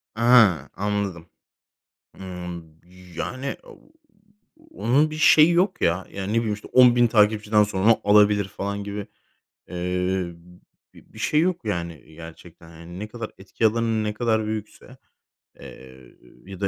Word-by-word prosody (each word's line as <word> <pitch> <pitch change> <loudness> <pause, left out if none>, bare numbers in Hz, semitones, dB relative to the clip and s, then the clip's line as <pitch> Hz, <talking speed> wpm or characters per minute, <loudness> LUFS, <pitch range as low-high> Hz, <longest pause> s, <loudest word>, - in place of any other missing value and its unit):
Ha, 110 - +4
anladım. 100 -4 -3 0.9
Imm, 90 -2 -7 0.5
yani, 130 +2 -4
ooo, - - -18 0.8
onun 150 - +1
bir - - -6
şeyi 155 +1 +6
yok 180 +4 +1
ya. 90 +2 0
Yani, 100 +2 -5
ne - - +1
bileyim, 110 -2 0
işte, 105 - -9
10.000 120 -1 +6
takipçiden 105 -1 +3
sonra 105 +2 +2
alabilir 105 -1 +4
falan 100 +1 -5
gibi, 100 0 -6 0.6
eee, 90 0 -2 0.6
bi - - -19
bir - - -14
şey 150 - +1
yok, 175 -3 -1
yani, 85 - -4
gerçekten. 80 +1 -13
Yani, 85 +2 -12
ne 105 +1 -6
kadar 115 -1 -7
etki 100 +4 -1
alanın 110 0 0
ne 105 0 -3
kadar 110 -1 0
büyükse, 110 +4 -7 0.6
eee, 65 -1 -14 0.3
ya 95 -1 -10
da 100 - +1
105 Hz, 135 wpm, -23 LUFS, 90-115 Hz, 0.9 s, şeyi